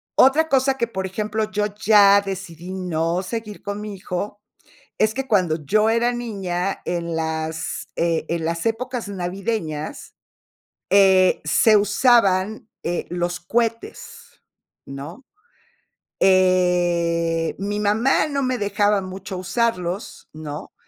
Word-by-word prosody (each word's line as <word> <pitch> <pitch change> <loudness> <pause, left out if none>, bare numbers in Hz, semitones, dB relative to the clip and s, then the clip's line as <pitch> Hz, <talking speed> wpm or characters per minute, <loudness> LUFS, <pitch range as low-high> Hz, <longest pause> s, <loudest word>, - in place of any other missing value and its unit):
Otra 295 +5 +5
cosa 270 -2 +2
que, 235 - 0
por 190 -4 -4
ejemplo, 215 +2 -3
yo 210 0 0
ya 205 -2 +6
decidí 185 -2 -7
no 175 -1 -1
seguir 215 +1 -6
con 205 +1 -5
mi 210 -1 -6
hijo 195 +3 -5 0.6
es 215 0 +2
que 270 0 -3
cuando 170 -7 +1
yo 215 +7 +3
era 235 +2 +2
niña, 195 -6 -3
en 170 -1 -3
las, 160 0 -3
eh, 165 -2 0
en 170 -1 -2
las 170 +4 -2
épocas 235 0 -2
navideñas, 180 -4 -4 0.8
eh, 190 -2 +5
se 220 -2 +4
usaban, 210 -1 +2 0.2
eh, 175 +1 -2
los 175 0 -2
cuetes, 235 - -3 0.5
¿no? 145 - -9 1.0
Eh, 175 -3 +2
mi 205 +1 -2
mamá 225 +9 +2
no 280 -2 -1
me 255 -1 -1
dejaba 205 0 +1
mucho 190 +1 -7
usarlos, 190 -1 -2
¿no?, 150 -1 -8
195 Hz, 120 wpm, -22 LUFS, 175-220 Hz, 1.0 s, ya